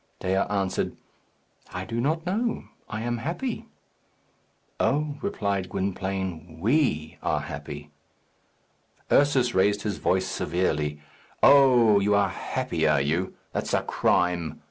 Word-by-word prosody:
Dea 95 - -1 0.2
answered, 100 -2 -1 0.7
"I - - -4
do 115 +1 -2
not 160 +5 0
know. 220 +6 -1 0.3
I 105 0 -4
am 120 0 -2
happy." 220 - -3 1.1
"Oh," 150 +1 +1
replied 100 - -1
Gwynplaine, 95 -4 -3
"we 100 - +1
are - - 0
happy." 75 +1 -7 1.2
Ursus 135 -4 +4
raised 100 +2 +2
his 105 -3 -2
voice 95 0 +1
severely, 75 -6 -1 0.4
"Oh, 125 -7 +7
you 100 +1 +2
are 100 -1 +3
happy, - - -2
are 75 -2 +4
you? 80 +7 -1 0.2
That's - - -1
a - - +1
crime. 85 -3 +1
100 Hz, 120 wpm, -26 LUFS, 85-130 Hz, 1.2 s, Oh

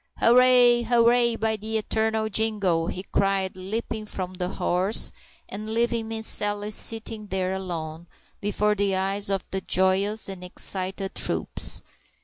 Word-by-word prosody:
"Hooray! 245 0 +6
hooray! 235 0 +3
By 220 0 -1
the 220 +2 -3
eternal 220 0 0
jingo!" 200 -6 +1
he 185 - -5
cried, 195 -1 +1
leaping 215 +3 -4
from 185 -2 -5
the 180 -1 -3
horse, 190 +2 +2 0.4
and 215 +2 -6
leaving 235 -1 0
Miss 220 0 -5
Sally 205 0 -1
sitting 220 0 -2
there 190 -1 -1
alone, 170 -3 -5 0.3
before 210 +1 +1
the 200 -1 0
eyes 195 +2 0
of 195 -1 -2
the 190 - -2
joyous 190 +4 +2
and 190 -2 -7
excited 190 +1 -1
troops. - - -2
205 Hz, 135 wpm, -25 LUFS, 190-220 Hz, 0.4 s, Hooray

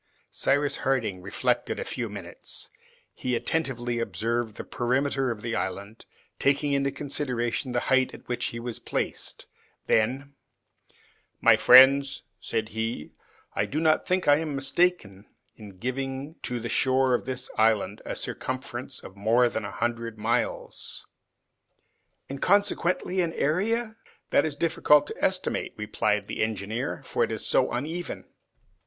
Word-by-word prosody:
Cyrus 145 0 +1
Harding 115 -9 0
reflected 95 +2 -1
a - - -1
few 120 -3 -3
minutes; 100 -4 -8 0.4
he 125 -1 -2
attentively 120 -4 -1
observed 115 -1 -2
the - - -5
perimeter 135 +2 0
of 110 -3 -4
the 115 -1 -2
island, 100 +4 -4 0.3
taking 140 +1 +2
into 140 0 +2
consideration 130 -3 -2
the 120 -1 0
height 130 -1 +2
at - - -15
which 125 - -2
he 115 - -4
was 120 -1 -5
placed; - - -3 0.4
then, 130 +6 +1 1.1
"My - - +7
friends," 135 +2 +7 0.2
said 110 -1 -2
he, 110 -7 -3 0.4
"I - - 0
do 150 - -2
not 160 -1 +2
think 185 0 +1
I 145 0 +7
am 155 -3 -3
mistaken 135 - 0 0.3
in 100 -4 -12
giving 135 - -3
to 125 -1 -2
the 115 - -4
shore 130 +1 +2
of 120 - 0
the 130 0 -3
island 110 -1 +2
a - - -4
circumference 130 0 -4
of 95 - -11
more 115 +5 +3
than 110 -1 -3
a - - -4
hundred 115 -1 -2
miles." 105 - -2 1.2
"And 135 0 -7
consequently 185 -2 +2
an 165 -2 -1
area?" 220 +8 0 0.3
"That 145 - +4
is 150 - -3
difficult 150 -2 +4
to - - -8
estimate," 185 -1 0
replied 105 -1 0
the - - -4
engineer, 110 +5 -2
"for 120 - 0
it 115 - -1
is 110 - -4
so 130 - +2
uneven." 160 +8 -4
125 Hz, 145 wpm, -27 LUFS, 115-140 Hz, 1.2 s, My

